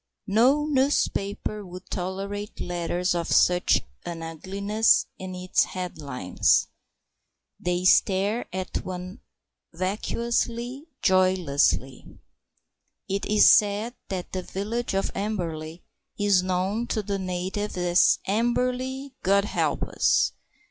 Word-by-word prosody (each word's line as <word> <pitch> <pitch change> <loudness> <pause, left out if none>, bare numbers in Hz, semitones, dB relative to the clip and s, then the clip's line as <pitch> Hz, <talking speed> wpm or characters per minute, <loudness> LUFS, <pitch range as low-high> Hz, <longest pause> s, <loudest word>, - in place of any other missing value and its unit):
No 250 +8 +3
newspaper 260 -7 0
would 180 0 -10
tolerate 195 +3 -4
letters 175 +1 -1
of 170 -1 -2
such 180 0 +4 0.2
an 170 -1 -6
ugliness 200 +7 +1
in 185 -1 -6
its 180 0 +1
headlines. 145 - 0 0.9
They 180 +1 -1
stare 200 +5 +3
at 185 0 -4
one 185 0 -7 0.5
vacuously, 235 - -2 0.2
joylessly. 180 -8 +1 0.9
It 195 +1 -2
is 210 0 +5
said 210 +3 +4 0.2
that 185 -2 -4
the 185 - -3
village 210 +5 -3
of 195 - 0
Amberley 170 -5 -4 0.3
is 205 -3 +3
known 185 +5 -1
to 215 -3 -1
the 200 -1 -2
natives 185 +2 -3
as 175 0 +4
"Amberley, 250 +5 -1
God 200 +1 +3
help - - -1
us!" - - +2
190 Hz, 105 wpm, -25 LUFS, 180-215 Hz, 0.9 s, is